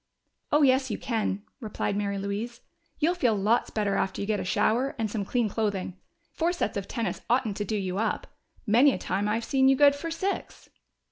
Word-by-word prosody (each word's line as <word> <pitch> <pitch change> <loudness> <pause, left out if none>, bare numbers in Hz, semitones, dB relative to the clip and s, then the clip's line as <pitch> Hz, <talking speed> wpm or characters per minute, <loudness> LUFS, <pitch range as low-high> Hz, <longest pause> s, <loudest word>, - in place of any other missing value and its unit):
"Oh, 295 0 +4
yes, 260 -1 +4
you 210 - -2
can," 215 -4 -2 0.2
replied 215 -3 -3
Mary 200 -1 -1
Louise. 210 +5 -4 0.4
"You'll 325 +3 +2
feel 250 -11 +2
lots 210 +4 +2
better 205 -2 0
after 190 - -1
you 200 - -2
get 210 0 0
a - - -2
shower 240 +8 +1
and 220 -2 -2
some 210 -2 -2
clean 235 +3 0
clothing. 200 -4 -2 0.4
Four 335 +2 0
sets 345 - -2
of 200 -1 -3
tennis 225 -7 -3
oughtn't 235 -4 +1
to 205 - -2
do 215 +2 -1
you 190 -1 -2
up. 220 -1 -1 0.4
Many 250 +6 +5
a - - -2
time 200 +2 -1
I've 225 +2 -1
seen 265 +1 +3
you 270 - +5
good 285 +1 +6
for 285 +4 -5
six." 375 +5 -4
220 Hz, 205 wpm, -27 LUFS, 200-265 Hz, 0.4 s, good